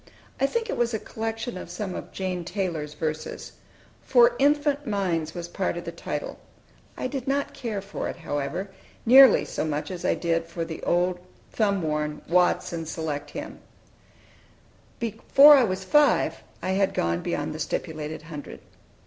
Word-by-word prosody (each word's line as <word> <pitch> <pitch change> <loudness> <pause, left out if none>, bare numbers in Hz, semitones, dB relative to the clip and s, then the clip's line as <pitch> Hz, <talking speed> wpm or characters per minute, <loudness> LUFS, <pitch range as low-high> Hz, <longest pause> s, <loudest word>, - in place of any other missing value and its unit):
I 275 - +3
think 465 +8 -2
it - - -3
was 235 -1 +1
a - - -2
collection 225 -1 -4
of - - -9
some 185 +1 -4
of - - -7
Jane 185 -2 -3
Taylor's 165 -5 -3
verses. 155 -1 -4 0.5
"For 240 -1 +5
Infant 290 0 +2
Minds," 175 -7 -1
was 170 -1 -5
part 180 0 -2
of 175 - -5
the - - -4
title. - - -5 0.6
I - - -3
did 260 -1 -4
not 280 +1 0
care 215 -6 -4
for 200 - -4
it, - - -5
however, 165 +4 -4 0.3
nearly 265 +3 +8
so - - -3
much 155 +2 -3
as 180 -1 -6
I - - +2
did 165 -1 -1
for 170 0 -4
the 160 -1 -7
old, 180 +1 +1 0.3
thumb 200 -4 +1
worn 150 -1 -2
"Watts' 180 +1 +2
and 165 -1 -4
Select 150 -3 -4
Hymns." 295 +2 -7 1.4
Before 235 +6 +6
I 265 - +5
was 190 -3 -1
five 295 +8 +3 0.2
I 185 +1 0
bad 195 - +1
gone 85 0 0
beyond - - -2
the - - -7
stipulated 155 0 -4
hundred. 155 -3 -9
185 Hz, 165 wpm, -26 LUFS, 165-235 Hz, 1.4 s, nearly